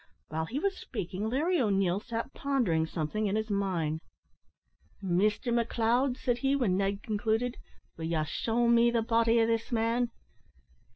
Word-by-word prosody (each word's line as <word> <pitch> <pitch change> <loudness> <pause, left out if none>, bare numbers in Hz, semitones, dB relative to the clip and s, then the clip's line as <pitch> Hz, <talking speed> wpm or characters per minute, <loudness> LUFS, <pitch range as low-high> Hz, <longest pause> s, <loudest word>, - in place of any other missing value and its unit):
While 160 +1 -2
he 245 - -5
was 390 +5 0
speaking, 200 -1 -4
Larry 315 +7 +1
O'Neil 195 -4 +2
sat 230 +4 -5
pondering 225 -14 +1
something 175 +7 -2
in 200 - 0
his 220 0 -2
mind. 170 -6 -1 1.0
"Mister 205 +5 +1
McLeod," 235 +2 +1
said 245 -2 -1
he, 270 +2 +2
when 235 -10 +1
Ned 195 +1 -1
concluded, 225 +3 0 0.4
"will 160 - -4
ye 160 -1 0
shew 230 +10 0
me 235 0 +5
the 235 -1 +1
body 230 0 +3
o' 225 - +4
this 230 +1 -1
man? 235 +1 +1
225 Hz, 155 wpm, -30 LUFS, 195-240 Hz, 1.0 s, me